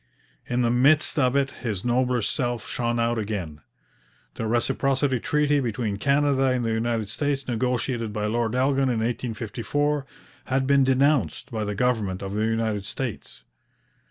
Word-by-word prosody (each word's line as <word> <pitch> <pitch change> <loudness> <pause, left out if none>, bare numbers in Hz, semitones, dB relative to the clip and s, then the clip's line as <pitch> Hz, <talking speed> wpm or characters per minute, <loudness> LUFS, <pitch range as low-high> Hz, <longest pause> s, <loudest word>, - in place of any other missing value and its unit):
In 125 0 0
the 120 - +2
midst 145 +6 +3
of 130 -1 +2
it 140 0 +2
his 110 -4 -4
nobler 125 -1 +1
self 120 -3 -2
shone 120 -1 -1
out 115 0 +1
again. 95 -8 -4 0.7
The 110 - -3
Reciprocity 135 +3 +1
Treaty 150 +2 +2
between 115 -4 -2
Canada 140 +2 +2
and 130 -2 +1
the 115 - 0
United 110 -1 -1
States, 140 +4 -2
negotiated 120 -1 -1
by 105 0 -2
Lord 115 +1 0
Elgin 135 +1 +2
in 120 - 0
1854, 125 +5 -2 0.4
had 130 0 0
been 140 0 +4
denounced 135 0 +1
by 110 -2 -2
the 105 -1 -3
government 105 -5 0
of 95 0 -5
the 105 +1 0
United 110 -2 -1
States. 100 - -6
120 Hz, 155 wpm, -25 LUFS, 110-135 Hz, 0.7 s, been